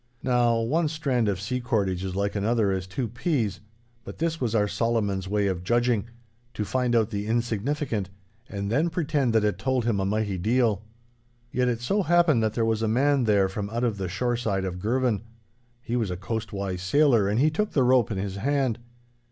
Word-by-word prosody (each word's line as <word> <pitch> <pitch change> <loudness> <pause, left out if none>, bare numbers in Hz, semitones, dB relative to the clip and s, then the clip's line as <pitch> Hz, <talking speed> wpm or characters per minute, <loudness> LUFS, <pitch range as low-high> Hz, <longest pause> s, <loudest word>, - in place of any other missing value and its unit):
Now, 120 -2 +2
one 155 +8 +1
strand 135 -8 0
of 95 -3 -1
sea 125 +6 -3
cordage 100 -7 0
is 95 -1 -4
like 100 +1 -1
another 105 0 +1
as 95 -1 -2
two 120 +6 -3
peas; 120 - -1 0.4
but - - -9
this 165 -1 -2
was 115 -3 0
our 105 -2 +3
Solomon's 105 -4 -1
way 105 +1 +1
of 90 -3 -1
judging—to 120 +1 -2
find 125 +1 0
out 115 -1 +2
the 100 0 -3
insignificant, 115 -1 -1 0.4
and 100 0 -4
then 150 +8 +2
pretend 150 -6 0
that 110 -1 +3
it 105 -3 0
told 130 +1 0
him 115 -4 +1
a 95 - 0
mighty 105 -2 -1
deal. 110 0 +2 0.7
Yet 125 0 +1
it 120 -1 -1
so 200 +12 +1
happened 175 -8 +3
that 110 -1 0
there 115 - +1
was 110 -1 0
a 110 - +1
man 135 +3 +2
there 100 -3 +3
from 100 +2 -4
out 120 +2 -2
of 115 -4 0
the 95 -2 -3
shoreside 110 -1 -1
of 90 -1 -4
Girvan. 120 +1 0 0.6
He 120 - -3
was 115 -5 0
a 90 - -3
coastwise 100 -2 -4
sailor, 115 0 +3
and 105 +3 +1
he 155 +3 +4
took 210 +7 -1
the 135 - +3
rope 125 -2 +4
in 105 - -3
his 95 0 -3
hand. 135 0 0
115 Hz, 200 wpm, -26 LUFS, 100-125 Hz, 0.7 s, he